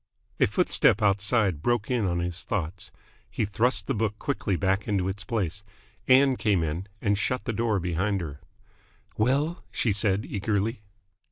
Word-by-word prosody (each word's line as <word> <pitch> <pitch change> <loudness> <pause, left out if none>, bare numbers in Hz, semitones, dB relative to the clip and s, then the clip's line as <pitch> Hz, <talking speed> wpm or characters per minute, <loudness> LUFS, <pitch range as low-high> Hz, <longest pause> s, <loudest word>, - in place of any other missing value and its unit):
A - - +5
footstep 100 - +3
outside 100 - +2
broke 120 +2 0
in 120 -4 +1
on 85 -1 0
his 90 +1 -4
thoughts. 90 -3 -3 0.4
He 110 - -1
thrust 110 +5 +1
the - - -1
book 105 -1 -1
quickly 105 -8 -1
back 95 +2 0
into 100 -3 0
its 95 +1 -3
place. 100 -3 -2 0.5
Ann 130 0 +5
came 100 -5 +2
in, 80 +5 -3 0.2
and 100 -1 +2
shut 125 +6 -1
the 115 - -1
door 110 -2 +1
behind 90 +3 0
her. 75 -5 -7 0.7
"Well?" 140 +9 +1
she 115 - 0
said 100 0 +1
eagerly. 105 +2 -1
105 Hz, 160 wpm, -27 LUFS, 95-115 Hz, 0.7 s, A